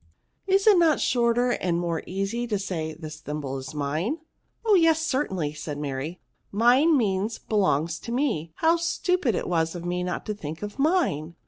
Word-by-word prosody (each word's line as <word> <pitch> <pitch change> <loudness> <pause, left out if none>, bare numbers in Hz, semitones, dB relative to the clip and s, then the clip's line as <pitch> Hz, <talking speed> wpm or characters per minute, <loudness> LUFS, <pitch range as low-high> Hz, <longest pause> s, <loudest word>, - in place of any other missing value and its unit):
Is 390 +1 +3
it 415 -5 +7
not 320 -4 +4
shorter 245 0 +2
and 175 -6 0
more 170 -2 -1
easy 195 +6 -2
to 210 -3 0
say, 165 -5 -4
this 155 -1 -8
thimble 145 -3 -4
is 135 +4 -8
mine? 155 - -1 0.2
" - - -46
" - - -39
Oh 435 - +4
yes, 325 -3 +4
certainly," 190 - -1
said 150 -1 -6
Mary; 145 +4 -4 0.3
mine 255 +9 +4
means, 210 -1 0
belongs 170 -6 0
to 235 - -7
me; 235 - -1
how 330 +1 +3
stupid 335 - 0
it - - -2
was 165 -1 0
of 175 0 -6
me 180 0 -1
not 180 -1 -3
to 210 - -2
think 160 -3 -7
of 210 +6 -6
mine 275 - +1
195 Hz, 190 wpm, -26 LUFS, 160-265 Hz, 0.3 s, it